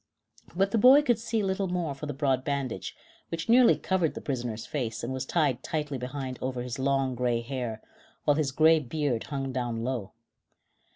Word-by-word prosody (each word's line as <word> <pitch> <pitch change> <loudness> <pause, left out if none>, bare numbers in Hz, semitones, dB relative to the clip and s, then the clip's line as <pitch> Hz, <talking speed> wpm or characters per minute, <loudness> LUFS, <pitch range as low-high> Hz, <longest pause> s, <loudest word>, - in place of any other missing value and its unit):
But 195 +2 +2
the 225 - +2
boy 265 +6 +8
could 240 -6 +2
see 225 -1 -1
little 190 0 0
more 175 -5 -2
for 145 +2 -7
the 145 - -3
broad 135 -3 +1
bandage, 140 -4 -3 0.3
which 165 -1 -4
nearly 240 +1 +6
covered 180 -4 0
the - - -4
prisoner's 120 -5 -3
face 115 -7 -3
and 125 +3 -3
was 130 0 -4
tied 145 -8 +1
tightly 150 -4 -3
behind 130 0 -5
over 125 -1 -2
his 125 0 -5
long, 135 -1 +1
gray 120 -1 0
hair, 120 -3 -4 0.4
while 145 - +5
his 145 -2 0
gray 160 +4 +5
beard 145 -4 -2
hung 135 -2 -3
down 120 -3 -2
low. 120 -5 -3
135 Hz, 185 wpm, -28 LUFS, 125-160 Hz, 0.4 s, boy